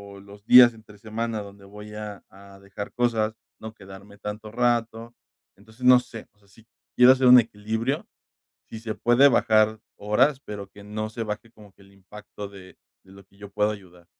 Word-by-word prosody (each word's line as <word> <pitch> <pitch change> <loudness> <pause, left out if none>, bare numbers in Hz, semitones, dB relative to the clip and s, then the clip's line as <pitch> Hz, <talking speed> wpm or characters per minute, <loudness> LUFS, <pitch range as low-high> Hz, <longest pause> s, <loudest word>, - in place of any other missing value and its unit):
o - - -13
los 100 +1 -16
días 125 0 +8
entre 110 -2 -17
semana, 110 +1 -4
donde 100 -1 -13
voy 105 +1 -12
a 105 -2 -8
a 100 0 -17
dejar 100 +1 -9
cosas, 115 -3 0 0.2
no 110 0 -9
quedarme 100 0 -14
tanto 105 +1 -7
rato. 120 -1 -1 0.4
Entonces, 110 +5 -17
no 125 0 +7
sé, 120 -3 -11
o 105 - -37
sea, 100 - -28
si 110 +3 -22 0.3
quiero 125 +1 +7
hacer 130 -1 +1
un 125 0 +9
equilibrio, 110 +4 -3 0.6
si 110 - -9
se 110 -1 -5
puede 120 +4 +4
bajar 110 -3 +2 0.2
horas, 130 +7 +1
pero, 100 -1 -8
que 100 +1 -16
no 110 +1 -5
se 115 +1 -6
baje 110 +1 -6
como 105 -3 -18
que - - -29
el 100 0 -21
impacto, 100 +1 -11
de 95 -2 -15 0.3
de 95 - -19
lo 100 0 -16
que 95 - -29
yo 100 -1 -11
puedo 105 +1 0
ayudar. 90 -4 -12
105 Hz, 195 wpm, -24 LUFS, 100-115 Hz, 0.6 s, un